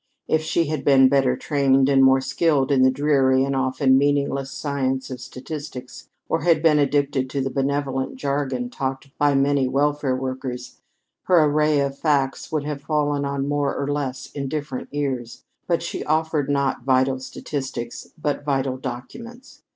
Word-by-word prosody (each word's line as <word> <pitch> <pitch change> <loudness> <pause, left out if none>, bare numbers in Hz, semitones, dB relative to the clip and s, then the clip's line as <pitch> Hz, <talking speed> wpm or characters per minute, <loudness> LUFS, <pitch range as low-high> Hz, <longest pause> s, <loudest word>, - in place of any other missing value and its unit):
If 160 - +2
she 165 +1 0
had 155 -2 -3
been 135 -2 +6
"better 135 -2 +2
trained," 135 -2 +2
and 135 -1 +4
more 130 0 +5
skilled 135 +1 +1
in 135 -2 +4
the 130 - +6
dreary 135 -1 +2
and 140 0 -1
often 130 0 +2
meaningless 140 -1 0
science 135 -2 -2
of 125 -2 -6
statistics, 130 -1 -8 0.2
or 165 - 0
had 165 -2 +2
become 155 -2 +5
addicted 140 -2 +1
to 140 - -3
the 135 0 -1
benevolent 135 -1 -1
jargon 145 - -2
talked 135 - -5
by 145 -1 +3
many 135 -1 +2
welfare 145 0 +1
workers, 130 -1 -5 0.4
her 175 -4 +5
array 150 0 +2
of 140 0 -3
facts 140 -4 0
would 155 -2 -1
have 145 -1 -4
fallen 145 -1 0
on 140 0 -2
more 145 -1 0
or 140 - -2
less 135 -2 -4
indifferent 140 -1 -4
ears. 135 -5 -3 0.2
But 170 -1 0
she 170 - -4
offered 155 -2 0
not 140 -3 0
vital 130 0 +2
statistics, 130 -2 -6
but 145 -2 -2
vital 135 -2 -1
documents. 230 - -9
140 Hz, 160 wpm, -23 LUFS, 130-145 Hz, 0.4 s, been